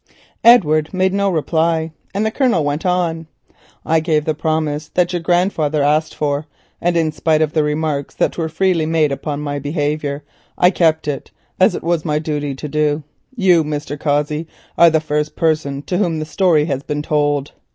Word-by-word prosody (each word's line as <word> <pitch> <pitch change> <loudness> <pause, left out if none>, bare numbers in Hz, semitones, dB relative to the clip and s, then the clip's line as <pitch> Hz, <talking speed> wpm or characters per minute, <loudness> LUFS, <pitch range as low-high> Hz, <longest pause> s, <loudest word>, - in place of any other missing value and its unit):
Edward 155 -10 +5
made 185 0 +1
no 200 0 +1
reply, 160 -1 0 0.2
and 205 +2 -1
the 220 - 0
Colonel 245 - +1
went 145 +5 -1
on:—"I 165 -2 -3
gave 155 -2 0
the 155 - +1
promise 155 -1 -2 0.2
your 175 -2 -2
grandfather 165 -4 +1
asked 155 +2 +1
for, 145 0 -2 0.3
and 175 0 +1
in 160 -2 +1
spite 155 0 +1
of 150 - -2
the 155 - +2
remarks 150 -1 -2
that - - 0
were 165 -2 -2
freely 165 -1 +1
made 160 -2 +2
upon 145 +1 -4
my 145 -1 -3
behaviour, 145 0 -2 0.3
I 180 +1 +5
kept 160 -4 +1
it, 140 -3 -4 0.3
as - - +4
it - - -6
was 170 -1 0
my 150 -2 0
duty 150 -2 -3
to 150 - -6
do. 150 0 0 0.3
You, 185 -7 +4
Mr. 150 -1 -4
Cossey, 150 +2 -1 0.3
are 170 - +7
the 160 -1 +2
first 150 -1 -2
person 155 -4 0
to 180 +3 -2
whom 170 -6 0
the 155 - -3
story 160 -3 +2
has 140 -4 -2
been 150 +1 -4
told. 145 -2 0
155 Hz, 180 wpm, -18 LUFS, 150-165 Hz, 0.3 s, are